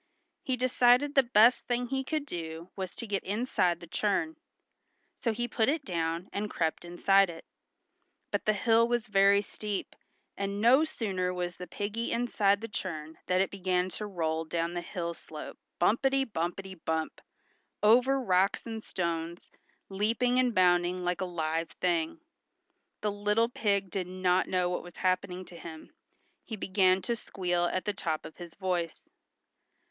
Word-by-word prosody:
He 260 Hz, -1 st, -1 dB
decided 250 Hz, +2 st, +4 dB
the 275 Hz, -, +7 dB
best 235 Hz, -1 st, +4 dB
thing 245 Hz, 0 st, 0 dB
he 265 Hz, +2 st, -2 dB
could 305 Hz, +1 st, -2 dB
do 165 Hz, -, -6 dB
was 190 Hz, -2 st, -5 dB
to -, -, -5 dB
get 200 Hz, -3 st, -2 dB
inside 195 Hz, -5 st, 0 dB
the 170 Hz, -, -10 dB
churn. 205 Hz, -, 0 dB, 0.8 s
So 230 Hz, -, 0 dB
he 240 Hz, +2 st, -2 dB
put 225 Hz, 0 st, +1 dB
it 300 Hz, -1 st, -1 dB
down 170 Hz, 0 st, -2 dB
and 205 Hz, +1 st, -2 dB
crept 160 Hz, -4 st, -1 dB
inside 195 Hz, +2 st, +3 dB
it. 165 Hz, -1 st, -9 dB, 0.9 s
But -, -, -1 dB
the 215 Hz, -, +4 dB
hill 225 Hz, +2 st, +3 dB
was 240 Hz, -1 st, 0 dB
very 200 Hz, 0 st, +4 dB
steep, 205 Hz, -1 st, -5 dB, 0.4 s
and 200 Hz, 0 st, -3 dB
no 250 Hz, +7 st, +6 dB
sooner 190 Hz, -10 st, -2 dB
was 180 Hz, -1 st, -3 dB
the 180 Hz, -, -8 dB
piggy 205 Hz, +6 st, -3 dB
inside 210 Hz, -4 st, +2 dB
the 225 Hz, -, -4 dB
churn 160 Hz, -7 st, -5 dB
than 185 Hz, 0 st, +3 dB
it 195 Hz, -, 0 dB
began 185 Hz, -1 st, 0 dB
to 210 Hz, +3 st, -5 dB
roll 160 Hz, -4 st, -1 dB
down 165 Hz, +1 st, -2 dB
the 175 Hz, -, -2 dB
hill 170 Hz, 0 st, -4 dB
slope 155 Hz, -2 st, -10 dB, 0.2 s
bumpety 270 Hz, +8 st, +3 dB
bumpety 190 Hz, -1 st, -3 dB
bump, 160 Hz, -1 st, -2 dB, 0.6 s
over 250 Hz, +5 st, +5 dB
rocks 190 Hz, -5 st, +2 dB
and 225 Hz, -1 st, -5 dB
stones, 170 Hz, -1 st, -3 dB, 0.4 s
leaping 230 Hz, +6 st, +1 dB
and 250 Hz, -3 st, +2 dB
bounding 180 Hz, 0 st, +3 dB
like 180 Hz, +1 st, -1 dB
a -, -, 0 dB
live 165 Hz, -2 st, -2 dB
thing. 170 Hz, -, -1 dB, 0.8 s
The 210 Hz, -, 0 dB
little 210 Hz, +3 st, +1 dB
pig 200 Hz, -5 st, 0 dB
did 185 Hz, -3 st, -2 dB
not 185 Hz, 0 st, +1 dB
know 180 Hz, -1 st, +1 dB
what 180 Hz, -, -2 dB
was 175 Hz, -, -12 dB
happening 185 Hz, 0 st, -1 dB
to 175 Hz, -, -12 dB
him. 160 Hz, -, -10 dB, 0.5 s
He 225 Hz, -, -6 dB
began 190 Hz, -2 st, +2 dB
to 235 Hz, -, 0 dB
squeal 180 Hz, -5 st, -1 dB
at 185 Hz, +1 st, -1 dB
the 210 Hz, -, 0 dB
top 165 Hz, -6 st, -2 dB
of -, -, -10 dB
his 175 Hz, -2 st, -10 dB
voice. 180 Hz, -4 st, -2 dB
190 Hz, 165 wpm, -30 LUFS, 175-225 Hz, 0.9 s, the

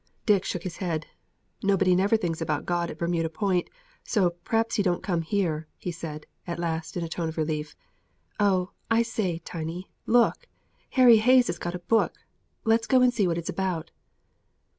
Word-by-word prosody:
Dick 205 Hz, -4 st, +4 dB
shook 175 Hz, -, -3 dB
his 185 Hz, -, -5 dB
head. 165 Hz, -5 st, -2 dB, 0.6 s
"Nobody 195 Hz, -2 st, +3 dB
never 200 Hz, +5 st, +3 dB
thinks 170 Hz, -6 st, -3 dB
about 150 Hz, -2 st, -1 dB
God 175 Hz, -1 st, 0 dB
at -, -, -7 dB
Bermuda 170 Hz, -1 st, 0 dB
Point, 180 Hz, +1 st, 0 dB, 0.3 s
so 190 Hz, -6 st, +2 dB
p'r'aps 225 Hz, 0 st, 0 dB
He -, -, +3 dB
don't 180 Hz, -3 st, 0 dB
come 175 Hz, -4 st, 0 dB
here," 160 Hz, -3 st, -1 dB
he 180 Hz, -, -4 dB
said, 155 Hz, -2 st, -7 dB, 0.2 s
at 170 Hz, -, -3 dB
last, 165 Hz, -1 st, -3 dB
in 175 Hz, -, -2 dB
a -, -, -3 dB
tone 165 Hz, 0 st, -3 dB
of 160 Hz, -, -8 dB
relief. 155 Hz, -1 st, -2 dB, 0.6 s
"Oh, 190 Hz, -3 st, +2 dB, 0.2 s
I 230 Hz, 0 st, +4 dB
say, 210 Hz, -7 st, -2 dB
Tiny, 165 Hz, +2 st, -5 dB, 0.2 s
look! 245 Hz, -, +3 dB, 0.5 s
Harry 245 Hz, -3 st, +8 dB
Hayes 250 Hz, +3 st, +5 dB
has 175 Hz, -, -3 dB
got 175 Hz, +1 st, -3 dB
a 175 Hz, -, -8 dB
book! 225 Hz, -, +2 dB, 0.5 s
Let's 225 Hz, +1 st, +2 dB
go 255 Hz, -2 st, +5 dB
and 250 Hz, -1 st, +4 dB
see 205 Hz, -6 st, +2 dB
what 170 Hz, -1 st, 0 dB
it's 170 Hz, -, -4 dB
about!" 185 Hz, -4 st, -2 dB
180 Hz, 185 wpm, -26 LUFS, 165-210 Hz, 0.6 s, Harry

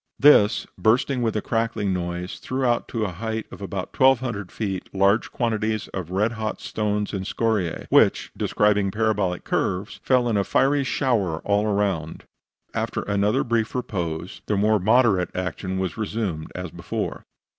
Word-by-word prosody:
This, 130 Hz, -7 st, +5 dB
bursting 125 Hz, +3 st, +2 dB
with 115 Hz, -2 st, 0 dB
a 105 Hz, -, -1 dB
crackling 115 Hz, -4 st, 0 dB
noise, 90 Hz, 0 st, -4 dB
threw 130 Hz, 0 st, -2 dB
out 120 Hz, -1 st, +1 dB
to 115 Hz, -, -3 dB
the 105 Hz, -, 0 dB
height 110 Hz, +4 st, -4 dB
of -, -, -10 dB
about 95 Hz, -1 st, -5 dB
1200 125 Hz, -7 st, +2 dB
feet 95 Hz, -4 st, -4 dB
large 100 Hz, +3 st, +3 dB
quantities 110 Hz, -2 st, -1 dB
of 90 Hz, -4 st, -5 dB
red 100 Hz, +5 st, +1 dB
hot 110 Hz, -2 st, -4 dB
stones 105 Hz, -1 st, -2 dB
and 95 Hz, -2 st, -2 dB
scoriae, 105 Hz, -4 st, -1 dB
which, -, -, +4 dB
describing 105 Hz, -1 st, +2 dB
parabolic 105 Hz, -4 st, 0 dB
curves, 95 Hz, +3 st, -2 dB
fell 125 Hz, -2 st, +2 dB
in 110 Hz, -3 st, +1 dB
a 100 Hz, -, +2 dB
fiery, 140 Hz, +6 st, +2 dB
shower 115 Hz, -, 0 dB
all 105 Hz, +1 st, +1 dB
around. 100 Hz, -6 st, -1 dB, 0.5 s
After -, -, -2 dB
another 105 Hz, +5 st, +1 dB
brief 115 Hz, -1 st, -1 dB
repose, 90 Hz, -8 st, -3 dB
the 105 Hz, -, +1 dB
more 105 Hz, +1 st, +3 dB
moderate 105 Hz, -2 st, +3 dB
action 95 Hz, +1 st, -3 dB
was 95 Hz, -3 st, -2 dB
resumed 105 Hz, -7 st, -3 dB
as -, -, -5 dB
before. -, -, -4 dB
105 Hz, 155 wpm, -24 LUFS, 95-115 Hz, 0.5 s, This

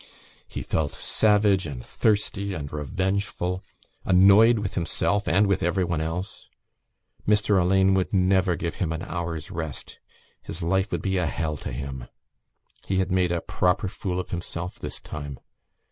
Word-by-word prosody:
He -, -, -6 dB
felt 75 Hz, -3 st, -1 dB
savage 105 Hz, -4 st, +2 dB
and 65 Hz, -5 st, -7 dB
thirsty 100 Hz, -2 st, 0 dB
and 70 Hz, -3 st, -6 dB
revengeful, 90 Hz, +4 st, -2 dB, 0.4 s
annoyed 100 Hz, +5 st, +6 dB
with 105 Hz, -2 st, -3 dB
himself 100 Hz, +3 st, 0 dB
and 95 Hz, +5 st, +4 dB
with 100 Hz, -1 st, +1 dB
everyone 85 Hz, -2 st, 0 dB
else. 80 Hz, +5 st, -4 dB, 0.8 s
Mr 105 Hz, -2 st, +3 dB
Alleyne 95 Hz, +2 st, +4 dB
would 95 Hz, -1 st, +1 dB
never 95 Hz, -1 st, +3 dB
give 85 Hz, -1 st, -4 dB
him 85 Hz, -3 st, 0 dB
an 80 Hz, +2 st, -4 dB
hour's 85 Hz, -4 st, -4 dB
rest; 80 Hz, -4 st, -6 dB, 0.4 s
his 85 Hz, -, -7 dB
life 95 Hz, +3 st, +1 dB
would -, -, -2 dB
be 95 Hz, -1 st, 0 dB
a 90 Hz, -2 st, +1 dB
hell 75 Hz, +2 st, -2 dB
to -, -, -6 dB
him. 65 Hz, -1 st, -6 dB, 0.8 s
He 95 Hz, -, 0 dB
had 95 Hz, 0 st, 0 dB
made 90 Hz, -1 st, +2 dB
a 85 Hz, -1 st, 0 dB
proper 90 Hz, +2 st, +1 dB
fool 90 Hz, -1 st, -3 dB
of 90 Hz, -, -5 dB
himself 85 Hz, 0 st, -5 dB
this -, -, -6 dB
time. 70 Hz, -3 st, -7 dB
90 Hz, 155 wpm, -25 LUFS, 80-95 Hz, 0.8 s, annoyed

